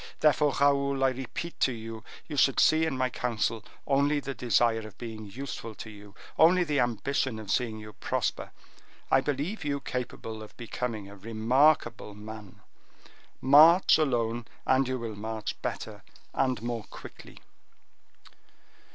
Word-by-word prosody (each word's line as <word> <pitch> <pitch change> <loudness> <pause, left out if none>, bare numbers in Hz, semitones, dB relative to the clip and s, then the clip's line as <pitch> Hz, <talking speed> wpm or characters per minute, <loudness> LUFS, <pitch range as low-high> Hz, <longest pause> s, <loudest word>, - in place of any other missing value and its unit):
Therefore, 150 -1 +3
Raoul, 140 -1 +2
I 135 - +5
repeat 135 +6 -6
to 130 - +3
you, 115 -1 -7 0.2
you 150 - -5
should 135 0 +3
see 160 +1 +4
in 140 -5 -2
my 130 0 0
counsel 115 -2 -1 0.2
only 140 +1 +2
the 140 -1 -5
desire 115 -2 +2
of 110 -3 -10
being 110 -3 -7
useful 115 -1 -7
to 110 - -9
you, 105 -1 -14 0.2
only 175 +3 +6
the 150 -4 0
ambition 120 +1 0
of 105 -2 -6
seeing 115 -3 0
you 105 0 -10
prosper. - - -2 0.6
I - - +5
believe 150 +9 -2
you 140 -1 -1
capable 115 -4 -5
of 110 - -12
becoming 115 -3 -4
a 100 - -11
remarkable 115 +2 +1
man. 105 -1 -10 0.8
March 160 +7 +7
alone, 120 -5 0 0.2
and 130 0 +3
you 130 0 -1
will 115 -3 -5
march 110 0 -5
better, - - -5 0.3
and 130 -4 +1
more 120 -3 -3
quickly." - - -12
125 Hz, 145 wpm, -28 LUFS, 110-140 Hz, 0.8 s, March